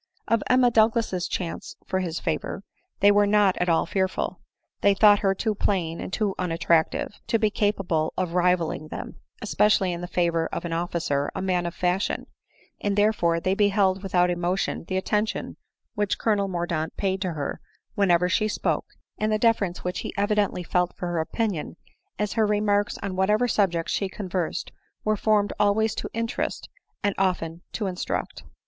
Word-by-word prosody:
Of 230 -2 +2
Emma 250 -1 +5
Douglas's 220 -5 +2
chance 170 -3 -4
for 185 - -1
his 175 -3 -3
favor, 200 - -3 0.4
they 205 +1 +7
were 205 0 +4
not 205 -2 +4
at 180 - 0
all 165 - +3
fearful; 190 -1 -2 0.4
they 200 -1 +4
thought 205 0 +6
her 195 -1 +1
too 220 +2 0
plain, 175 -5 -1
and - - -6
too 205 0 0
unattractive, 170 +2 +1
to 230 0 +2
be 215 -1 +1
capable 195 -7 0
of 180 -2 -1
rivalling 175 -3 +1
them; - - -7 0.3
especially 195 -3 +2
in 170 - -5
the 175 - -4
favor 170 -2 +1
of - - -5
an 170 - -3
officer, 165 -4 -1
a - - -2
man 180 -2 0
of 170 - -6
fashion; 180 +2 0 0.6
and 205 -1 0
there 210 +1 +4
fore 170 -4 +1
they 185 +3 0
beheld 195 -2 +2
without 180 -2 +2
emotion 175 0 -1
the 185 - -1
attention 210 +3 -1 0.4
which 205 -1 0
Colonel 205 -3 +1
Mordaunt 170 -3 -2
paid 190 -1 -1
to 185 -3 -1
her 145 -3 -4 0.3
whenever 180 -3 +3
she 215 +4 +1
spoke, 215 - -1 0.3
and 215 0 +1
the 215 - +3
deference 215 -5 +1
which 180 0 -2
he - - -5
evidently 205 -2 +1
felt 180 +1 0
for 175 - -3
her 170 -1 -1
opinion, 185 0 -2 0.4
as 210 -1 -1
her 220 -2 +2
remarks 205 0 +1
on 195 -2 -3
whatever 210 +6 +2
subject 180 -7 +1
she 195 - -1
conversed 185 -3 -3 0.3
were 215 0 +2
formed 210 -1 +2
always 210 +2 +3
to - - -4
interest, 230 0 -3 0.3
and 205 -1 +2
often 175 -3 0
to 215 - -2
instruct. 185 -2 -3
190 Hz, 175 wpm, -25 LUFS, 175-210 Hz, 0.6 s, they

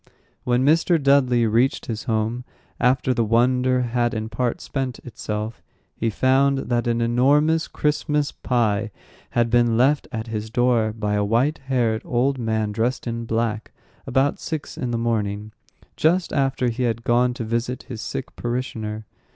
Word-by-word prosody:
When 125 +1 +2
Mr. 165 +3 +4
Dudley 135 -4 +3
reached 115 +5 +1
his 110 -2 -5
home, 115 +2 -1 0.4
after 130 +1 +2
the 115 - +1
wonder 125 +3 +2
had 120 0 0
in 110 0 -3
part 120 +1 -1
spent 130 -3 -3
itself, 110 -2 -5 0.3
he 115 - -1
found 135 +5 +3
that 120 -1 +1
an 115 0 +1
enormous 145 +7 +3
Christmas 150 0 0
pie 115 -3 0 0.5
had 115 -1 +2
been 120 -1 +3
left 140 +4 +3
at 110 -1 -4
his 110 -1 -4
door 120 -2 +2
by 105 -1 -2
a 105 0 +1
white 120 +9 +1
haired 120 -4 +1
old 130 +2 0
man 110 -2 -1
dressed 115 +5 -1
in 115 -1 -3
black, 115 -1 -2 0.3
about 135 +2 +1
six 160 -3 -5
in 125 - -3
the 120 - -1
morning, 110 -2 -2 0.4
just 170 +2 +1
after 135 -2 +1
he 120 +2 -4
had 115 -2 0
gone 120 +1 +2
to 125 - -4
visit 115 +3 -2
his 115 -4 -7
sick 135 - -5
parishioner. 110 -3 -4
120 Hz, 160 wpm, -23 LUFS, 110-130 Hz, 0.5 s, Mr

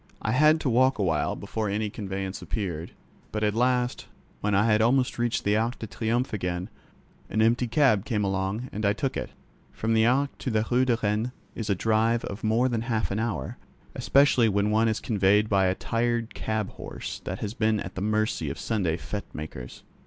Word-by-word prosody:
I 110 - 0
had 155 +5 +5
to - - -1
walk 130 +2 +3
a 105 - 0
while 80 -5 0
before 110 -2 -3
any 105 +1 -1
conveyance 95 -2 -4
appeared, 85 -6 -4 0.4
but 105 0 -2
at 105 -1 +2
last, 125 +1 0 0.3
when 105 -1 0
I 100 +2 +4
had 110 -1 +3
almost 125 +2 +2
reached 120 -1 0
the 100 +1 +2
Arc 115 +3 0
de - - -6
Triomphe 115 +5 -1
again, 90 0 -3 0.6
an 110 - -1
empty 115 +3 +3
cab 120 -5 +3
came 105 -2 -1
along 95 +5 -1
and 105 +1 -4
I 100 0 +3
took 135 +5 -2
it. - - -3 0.4
From 115 +1 -1
the 110 0 +4
Arc 140 +3 +1
to - - -3
the 110 -2 +1
Rue 125 +1 +4
de 120 -3 +2
Rennes 105 +3 +1 0.2
is 110 -2 -5
a 100 - +3
drive 110 +3 +1
of 100 +2 -7
more 115 +4 +3
than 120 -3 -1
half 115 -3 -1
an 100 - -1
hour, 105 - -3 0.3
especially 135 -4 +4
when 100 +1 +1
one 110 +1 +3
is 110 -1 0
conveyed 105 -1 +2
by 95 -2 +3
a 90 - +1
tired 115 +1 -1
cab 110 -2 -2
horse - - -7
that - - -3
has 105 0 -4
been 110 -3 +1
at - - -6
the 95 - -5
mercy 110 +1 0
of - - -5
Sunday 95 -8 -1
fĻte 100 +4 -6
makers. 75 -5 -8
110 Hz, 205 wpm, -26 LUFS, 100-120 Hz, 0.6 s, had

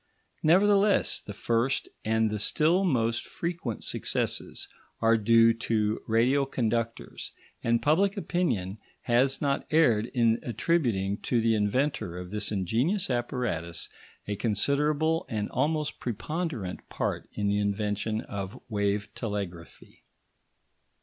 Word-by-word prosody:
Nevertheless, 200 +4 +4
the - - -8
first 115 +5 0 0.2
and 110 0 +1
the 105 - -2
still 165 - +3
most 115 -9 +1
frequent 170 -9 -4
successes - - -2 0.3
are 115 0 +4
due 115 +1 +5
to 110 -2 -1
radio 125 +5 +3
conductors, 115 -2 -2 0.3
and 115 0 +1
public 195 +7 +3
opinion 110 - -1 0.2
has 130 +3 +2
not 140 -1 0
erred 120 -9 +3
in 115 -3 +2
attributing 115 - 0
to 120 - 0
the 115 0 +3
inventor 105 - 0
of 90 0 -7
this 105 0 -1
ingenious 120 - 0
apparatus 120 - -2 0.4
a 105 - -1
considerable 150 - +1
and 105 -4 -2
almost 150 +2 -1
preponderant 125 - -4
part - - -3
in 105 - -2
the 100 0 +2
invention 105 +1 -1
of 100 +4 -6
wave 100 -1 0
telegraphy. 100 -7 -6
115 Hz, 115 wpm, -28 LUFS, 105-145 Hz, 0.4 s, due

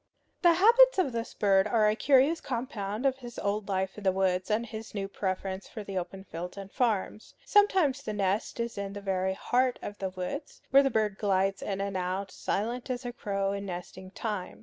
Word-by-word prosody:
The 345 -2 +6
habits 470 +7 +6
of 360 -8 +2
this 230 0 -4
bird 195 -2 +3
are 220 -2 +3
a 210 - +3
curious 280 +6 +4
compound 230 -3 -3
of 265 -1 +2
his 240 -2 -9
old 205 0 -2
life 190 +1 -1
in - - -11
the 190 - +4
woods 185 0 0
and 220 +2 +1
his 220 -1 -8
new 195 -1 -2
preference 190 0 -3
for 215 - -7
the 195 -1 -7
open 190 +2 -7
fields 180 0 -7
and 195 0 -8
farms. 220 -4 -1
Sometimes 375 -10 +4
the 220 - -4
nest 200 +3 -1
is 235 -3 -3
in 200 0 -4
the 205 - -6
very 190 -1 0
heart 250 +4 +1
of 205 - -6
the 190 - -2
woods, 185 - -6
where 275 +1 +8
the 275 - +2
bird 215 -5 0
glides 195 -1 +1
in 195 -1 -3
and 200 -1 -3
out, 185 +1 -2
silent 240 +5 -2
as 250 0 -3
a 245 - -4
crow 195 -4 -1
in 200 0 -4
nesting 185 +1 -7
time. 205 -2 -4
205 Hz, 210 wpm, -29 LUFS, 195-245 Hz, -, where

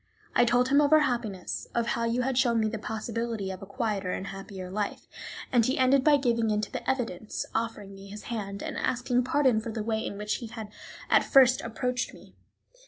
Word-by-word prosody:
I 240 - +5
told 245 +2 +3
him 280 +2 +5
of 290 0 +2
our 310 0 +7
happiness, 235 -9 -2
of 235 -1 +1
how 230 - 0
you 235 +2 0
had 265 0 0
shown 240 -2 +3
me 220 - +2
the 220 0 -3
possibility 220 -2 -3
of 190 +1 -8
a 195 - -8
quieter 200 -3 -2
and 190 - -4
happier 195 -2 -7
life, 205 +1 -3 0.5
and 240 -2 +4
he 260 +4 +1
ended 260 +1 +4
by 295 -1 +6
giving 235 -4 +1
in 210 -1 +1
to - - -4
the - - -4
evidence, 230 -6 -2
offering 220 -3 -3
me 195 0 -11
his 210 +1 -9
hand, 200 -4 -5
and - - -4
asking 250 0 +1
pardon 260 -3 +3
for 220 - -5
the 220 -1 -3
way 220 0 -1
in 200 - -5
which 210 0 -1
he 235 - -7
had 220 -2 -7 0.4
at - - +6
first 260 -2 +5
approached 245 +2 -2
me. - - -16
230 Hz, 220 wpm, -28 LUFS, 210-250 Hz, 0.5 s, our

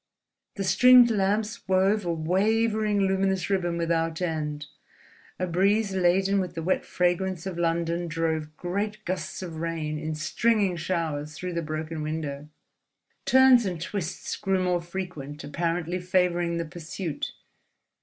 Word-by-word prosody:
The 200 - -2
stringed 245 +5 +7
lamps 210 +2 0
wove 190 +2 +2
a - - +1
wavering 210 +5 +1
luminous 190 -1 +1
ribbon 175 -3 0
without 165 -1 0
end; 150 -4 -2 0.7
a 185 - -1
breeze 195 +4 +2
laden 190 +2 +2
with 180 -2 -3
the 165 - -4
wet 185 - +1
fragrance 180 0 0
of 180 -3 -4
London 170 0 0
drove 160 -1 -2
great 205 +4 -3
gusts 190 +1 -4
of 165 -3 -6
rain 160 -2 -3
in 155 0 -3
stringing 200 +4 +1
showers 160 -3 -2
through 180 +2 -5
the 170 - -1
broken 155 0 -4
window. 150 -2 -4 0.8
Turns 260 -2 +6
and 175 -3 -3
twists 180 0 -4
grew 190 -1 0
more 180 -1 +1
frequent, 170 -5 -6
apparently 170 +3 -2
favouring 175 -1 +1
the 170 - -2
pursuit. 170 0 -5
175 Hz, 135 wpm, -26 LUFS, 165-195 Hz, 0.8 s, stringed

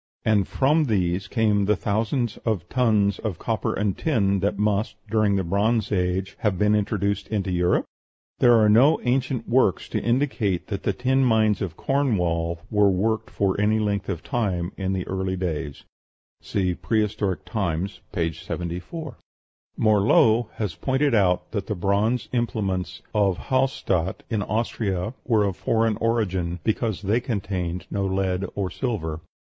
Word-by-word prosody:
And 105 -4 +3
from 150 +4 +2
these 95 -4 0
came 105 -3 +2
the 105 +2 +3
thousands 110 +4 -1
of 100 -7 -2
tons 105 -6 +2
of 105 -7 -3
copper - - -1
and 105 -2 0
tin 100 -10 +1
that 100 +2 0
must, 105 +2 0
during 105 -1 +2
the 95 - 0
Bronze 105 +6 +1
Age, 95 0 -1
have 105 -4 0
been 105 +2 +3
introduced 100 -1 0
into 100 -3 -2
Europe? 90 0 +2 0.5
There 120 -1 +6
are 110 -1 +5
no 125 +9 +5
ancient 130 -1 0
works 120 -8 +2
to - - -1
indicate 120 -7 0
that 100 -2 -3
the 100 - 0
tin 130 +5 +1
mines 110 -4 +3
of 90 -5 -4
Cornwall 90 -12 0
were 105 -2 +4
worked 110 +4 0
for 100 0 0
any 105 +1 +3
length 105 -2 -1
of 85 -5 -3
time 95 -8 -1
in 95 -1 -2
the 95 -1 -3
early 95 0 -2
days 80 -6 -4 0.6
(see 90 -2 -1
"Prehistoric 105 -2 -1
Times," 95 -2 -2
p. 85 -4 -1
74). 90 - -6 0.6
Morlot 110 +2 +4
has 105 -6 -2
pointed 135 - 0
out 95 -5 +2
that 100 -3 -3
the 105 - -2
bronze 100 +6 0
implements 100 -6 -2
of 100 -4 +2
Hallstadt, 130 -9 0
in 110 -2 0
Austria, 105 -1 -2
were 110 -4 +3
of 100 -3 -1
foreign 115 -2 +1
origin, 95 -7 -1
because 110 -2 -1
they 105 +5 +2
contain 95 -7 -3
no 100 -1 -1
lead 95 0 0
or 95 -2 -2
silver. 80 - -3
105 Hz, 150 wpm, -24 LUFS, 95-115 Hz, 0.6 s, There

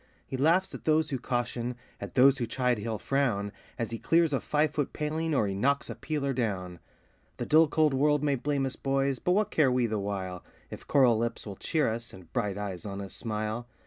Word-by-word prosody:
He - - -5
laughs 170 +8 +2
at - - -9
those 155 -1 +2
who 135 - -1
caution, 120 0 -2 0.2
at - - -7
those 135 +1 +6
who 120 - -1
chide 125 -1 0
he'll 110 +1 -3
frown, 110 -7 0 0.3
As 115 -1 -3
he 115 - -4
clears 165 -2 +3
a 135 - +2
five 150 0 +1
foot 145 -3 -2
paling, 155 +1 -1
or 110 - +3
he 100 - -2
knocks 140 +8 0
a - - -6
peeler 140 -3 -2
down. 95 -8 -2 0.6
The - - -3
dull, 160 +1 +6
cold 155 -1 +2
world 150 +2 +2
may 145 -1 +2
blame 140 +1 0
us, 130 - -3
boys! 135 -1 0
but 180 - +1
what 210 +2 +1
care 145 -5 +3
we 125 -1 +2
the 110 -2 -1
while, 95 -3 -4 0.3
If - - -9
coral 125 -5 +4
lips 115 0 -2
will 100 -2 -6
cheer 155 - 0
us, 115 +1 -4
and 90 -3 -14
bright 105 -5 -1
eyes 100 -4 -5
on 100 -1 -5
us 100 -2 -6
smile? 110 +1 -3
125 Hz, 220 wpm, -29 LUFS, 110-145 Hz, 0.6 s, those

